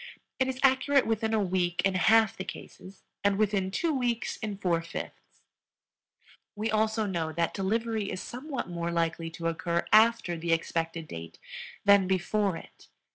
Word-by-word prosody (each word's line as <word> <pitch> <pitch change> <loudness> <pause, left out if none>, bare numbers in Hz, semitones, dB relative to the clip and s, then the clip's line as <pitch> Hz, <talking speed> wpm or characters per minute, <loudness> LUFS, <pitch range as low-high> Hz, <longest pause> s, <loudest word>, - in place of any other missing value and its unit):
It 260 - +2
is 260 0 -3
accurate 270 +1 +4
within 225 0 0
a 220 - +2
week 180 -3 0
in 195 - +2
half 220 +4 +4
the 190 - -5
cases 190 +1 -10 0.2
and 200 -1 +2
within 200 -3 +1
two 320 - 0
weeks 245 -4 -1
in 210 -3 -5
four 175 -4 +1
fifths. 165 - -9 1.1
We 215 +1 -2
also 220 0 +1
know 170 -5 -2
that 170 0 0
delivery 220 +1 -1
is - - -4
somewhat 265 +5 -5
more 170 -1 -3
likely 165 -1 -1
to 165 0 -8
occur 170 +1 -1
after 220 -5 +5
the 165 0 0
expected 165 0 -2
date 85 - -8 0.5
than 200 -2 +6
before 190 0 0
it. - - -15
195 Hz, 160 wpm, -28 LUFS, 170-225 Hz, 1.1 s, than